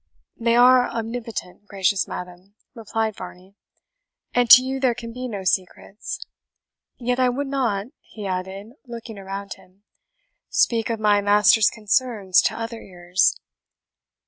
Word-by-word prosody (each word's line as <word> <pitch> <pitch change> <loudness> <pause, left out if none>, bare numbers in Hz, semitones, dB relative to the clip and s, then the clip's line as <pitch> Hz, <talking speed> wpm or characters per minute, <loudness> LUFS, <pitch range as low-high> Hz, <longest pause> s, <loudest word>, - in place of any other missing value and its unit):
"They 230 0 +2
are 250 +1 +5
omnipotent, 225 -4 -6
gracious 195 -1 0
madam," 180 +3 -9 0.2
replied 225 -2 -3
Varney; 185 +1 -11 0.8
"and 245 -1 +2
to 255 - +10
you 265 +1 -3
there 255 -3 +1
can 230 -1 -8
be 255 +1 -5
no 205 -5 -6
secrets. 190 +2 -3 0.7
Yet 250 +1 -2
I 255 -1 +3
would 275 +4 -2
not," 245 -8 -1
he 210 -2 -11
added, 190 +3 -5 0.2
looking 230 -3 -9
around 195 0 -6
him, 185 +2 -23 0.7
"speak 230 -1 +1
of 225 -1 -2
my 210 -1 +3
master's 205 +1 +5
concerns 210 -3 +1
to - - 0
other 230 0 -6
ears." 180 0 0
215 Hz, 135 wpm, -22 LUFS, 195-240 Hz, 0.8 s, to